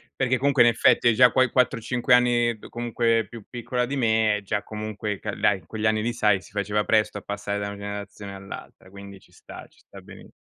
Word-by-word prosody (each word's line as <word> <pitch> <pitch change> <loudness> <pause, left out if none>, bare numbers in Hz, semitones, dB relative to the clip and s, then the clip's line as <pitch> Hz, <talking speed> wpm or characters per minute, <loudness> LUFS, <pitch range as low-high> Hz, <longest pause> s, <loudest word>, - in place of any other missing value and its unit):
Perché 130 -1 +1
comunque 135 -1 +3
in 120 - +6
effetti 120 - +3
hai 120 - +4
già 125 +1 +6
quei 130 +1 +3
4-5 125 -1 +1
anni, 120 -1 +3
più - - -13
comunque 115 -2 0
più 115 0 -11
piccola 125 +1 -2
di 135 +3 -4
me, 110 -3 +2
e - - -8
già 105 +1 -2
comunque 105 -1 -5
ca - - -5
dai, 100 -2 +1
in 85 - -23
quegli 110 +4 -5
anni 110 0 +1
lì 120 +2 -2
sai, 105 -4 +2
si - - -17
faceva 105 +1 -1
presto 105 -1 +1
a - - -17
passare 100 0 -4
da 100 - -3
una 100 0 -7
generazione 100 0 -7
all'altra, 95 -1 -11
quindi 100 0 -12
ci - - -25
sta, - - -12
ci - - -28
sta - - -15
beni - - -14
110 Hz, 230 wpm, -24 LUFS, 100-120 Hz, -, in